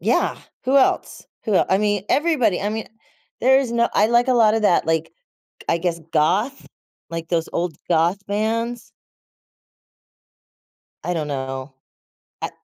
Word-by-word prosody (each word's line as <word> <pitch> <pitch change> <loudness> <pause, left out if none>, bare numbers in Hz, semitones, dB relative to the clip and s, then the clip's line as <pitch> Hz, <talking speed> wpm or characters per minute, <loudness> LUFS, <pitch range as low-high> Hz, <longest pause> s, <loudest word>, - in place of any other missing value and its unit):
Yeah. - - +1 0.3
Who 265 +2 +3
else? 270 - +1 0.2
Who 215 -4 0
el - - +4
I 190 - +3
mean, 205 -2 0
everybody. 280 - +2
I 205 - -1
mean, 220 0 -4 0.5
there 265 +2 +5
is 240 -4 -3
no 235 0 +2
I 210 - +4
like 240 +2 +3
a - - +4
lot 220 -2 +5
of 220 - 0
that, 175 -5 +3
like, 160 0 0 0.5
k - - -15
I 170 - +3
guess, 170 -1 -2
goth, 205 - +1 0.4
like 165 -1 -5
those 165 -1 0
old 170 -3 -2
goth 175 +4 +2
bands. 225 +3 -2 2.1
I 180 - -1
don't 155 -3 -2
know. 130 0 -4 0.7
I - - -3
205 Hz, 155 wpm, -21 LUFS, 165-235 Hz, 2.1 s, there